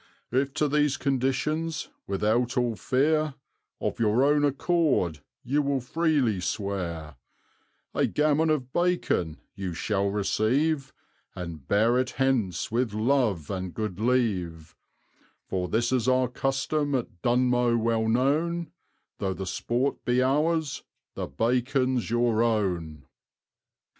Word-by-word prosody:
If 135 Hz, +2 st, 0 dB
to 150 Hz, -, +2 dB
these 150 Hz, -1 st, +2 dB
conditions, 145 Hz, +4 st, -1 dB, 0.2 s
without 110 Hz, +6 st, 0 dB
all 120 Hz, -2 st, +1 dB
fear, 150 Hz, -, +1 dB, 0.4 s
Of -, -, -3 dB
your 115 Hz, +3 st, +3 dB
own 145 Hz, +1 st, +3 dB
accord 145 Hz, -, +1 dB, 0.2 s
you 145 Hz, +4 st, +1 dB
will 140 Hz, -1 st, 0 dB
freely 135 Hz, -, +1 dB
swear, 85 Hz, -6 st, -3 dB, 0.8 s
A -, -, +2 dB
gammon 155 Hz, +1 st, +2 dB
of 130 Hz, -5 st, -1 dB
bacon 175 Hz, -, 0 dB, 0.2 s
you 95 Hz, -4 st, -5 dB
shall 100 Hz, +2 st, 0 dB
receive, 130 Hz, +9 st, +1 dB, 0.4 s
And 85 Hz, -6 st, -7 dB
bear 115 Hz, +5 st, +3 dB
it 130 Hz, -1 st, 0 dB
hence 125 Hz, -10 st, 0 dB
with 115 Hz, -2 st, 0 dB
love 110 Hz, -, +1 dB
and 95 Hz, -2 st, -4 dB
good 105 Hz, -4 st, -3 dB
leave; 95 Hz, -10 st, 0 dB, 0.7 s
For 90 Hz, -1 st, -2 dB
this 120 Hz, +2 st, +1 dB
is 125 Hz, -2 st, +1 dB
our 130 Hz, 0 st, +3 dB
custom 135 Hz, +3 st, -1 dB
at 115 Hz, -9 st, -4 dB
Dunmow 125 Hz, -1 st, +2 dB
well 115 Hz, -1 st, +1 dB
known, 155 Hz, +8 st, +1 dB, 0.5 s
Though 95 Hz, -1 st, -1 dB
the 95 Hz, -, -5 dB
sport 120 Hz, +8 st, -1 dB
be 125 Hz, +1 st, +2 dB
ours 150 Hz, +2 st, +1 dB, 0.3 s
the -, -, -4 dB
bacon's 125 Hz, -, 0 dB
your 120 Hz, -1 st, +2 dB
own. 90 Hz, -, -1 dB
125 Hz, 125 wpm, -27 LUFS, 100-140 Hz, 0.8 s, your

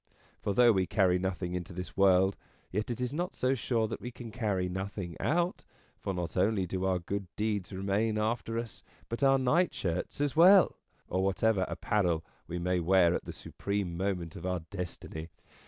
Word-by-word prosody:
For 100 Hz, -, -1 dB
though 120 Hz, -1 st, +7 dB
we 95 Hz, -3 st, +1 dB
carry 90 Hz, -3 st, +3 dB
nothing 90 Hz, -1 st, -2 dB
into 90 Hz, 0 st, -4 dB
this 90 Hz, +1 st, -6 dB
world, 95 Hz, 0 st, +4 dB, 0.4 s
yet 105 Hz, +5 st, -2 dB
it 120 Hz, -, -3 dB
is 125 Hz, +1 st, -2 dB
not 175 Hz, +5 st, -2 dB
so 130 Hz, +1 st, +1 dB
sure 115 Hz, -3 st, 0 dB
that 110 Hz, -, -5 dB
we 125 Hz, -, -5 dB
can 120 Hz, -2 st, -9 dB
carry 105 Hz, -6 st, -1 dB
nothing 95 Hz, -2 st, -4 dB
out: 175 Hz, +3 st, 0 dB, 0.4 s
for -, -, -3 dB
not 90 Hz, -2 st, -4 dB
only 95 Hz, +1 st, +2 dB
do 95 Hz, +1 st, -2 dB
our 95 Hz, -1 st, +2 dB
good 95 Hz, +2 st, -4 dB
deeds 105 Hz, -3 st, -1 dB
remain 100 Hz, +3 st, 0 dB
after 115 Hz, +1 st, -1 dB
us, 115 Hz, -3 st, -5 dB, 0.3 s
but 115 Hz, -, -4 dB
our 135 Hz, -1 st, +5 dB
nightshirts 130 Hz, -, 0 dB
as 145 Hz, 0 st, 0 dB
well, 180 Hz, +3 st, +7 dB, 0.3 s
or 95 Hz, +1 st, 0 dB
whatever 95 Hz, +1 st, +2 dB
apparel 90 Hz, -6 st, 0 dB, 0.2 s
we 85 Hz, -, -4 dB
may 90 Hz, +1 st, 0 dB
wear 90 Hz, 0 st, +4 dB
at -, -, -2 dB
the -, -, -5 dB
supreme 100 Hz, -4 st, -3 dB
moment 90 Hz, -3 st, -2 dB
of -, -, -8 dB
our 90 Hz, -2 st, -1 dB
Destiny. 90 Hz, -3 st, -6 dB
95 Hz, 185 wpm, -31 LUFS, 90-115 Hz, 0.4 s, though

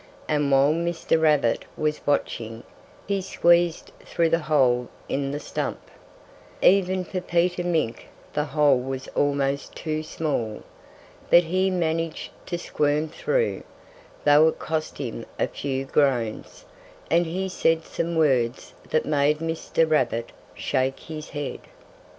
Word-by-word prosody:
And 145 Hz, -2 st, +1 dB
while 135 Hz, +2 st, +5 dB
Mr. 165 Hz, -1 st, 0 dB
Rabbit 150 Hz, -7 st, +3 dB
was 150 Hz, 0 st, -1 dB
watching, 115 Hz, -5 st, -1 dB, 0.4 s
he 200 Hz, -1 st, 0 dB
squeezed 175 Hz, -2 st, +2 dB
through 165 Hz, -1 st, +1 dB
the 165 Hz, +1 st, +2 dB
hole 130 Hz, -6 st, +2 dB, 0.2 s
in 135 Hz, 0 st, -1 dB
the 145 Hz, +1 st, -3 dB
stump. -, -, -3 dB, 0.8 s
Even 185 Hz, -1 st, +3 dB
for 185 Hz, 0 st, -4 dB
Peter 175 Hz, 0 st, +1 dB
Mink 160 Hz, -10 st, -1 dB, 0.3 s
the 150 Hz, -, 0 dB
hole 145 Hz, -2 st, +3 dB
was 130 Hz, +1 st, -5 dB
almost 140 Hz, -1 st, 0 dB
too 155 Hz, -1 st, -3 dB
small. 150 Hz, -9 st, -3 dB, 0.7 s
But 175 Hz, -, +7 dB
he 185 Hz, +3 st, +1 dB
managed 165 Hz, -3 st, -2 dB, 0.2 s
to 175 Hz, -, -2 dB
squirm 150 Hz, -1 st, 0 dB
through, 465 Hz, -, 0 dB, 0.6 s
though 150 Hz, +2 st, +7 dB
it 160 Hz, -, 0 dB
cost 155 Hz, 0 st, -3 dB
him 120 Hz, -4 st, -5 dB
a -, -, +2 dB
few 135 Hz, -1 st, -3 dB
groans; 130 Hz, -6 st, 0 dB, 0.5 s
and 170 Hz, +1 st, +3 dB
he 185 Hz, +4 st, -2 dB
said 165 Hz, -3 st, +1 dB
some 170 Hz, 0 st, -3 dB
words 130 Hz, -6 st, +1 dB, 0.2 s
that 155 Hz, -, +1 dB
made 150 Hz, 0 st, +2 dB
Mr. 165 Hz, 0 st, 0 dB
Rabbit 120 Hz, -6 st, 0 dB, 0.2 s
shake 130 Hz, 0 st, -1 dB
his 155 Hz, -1 st, -8 dB
head. 145 Hz, -2 st, -4 dB
155 Hz, 135 wpm, -25 LUFS, 135-170 Hz, 0.8 s, But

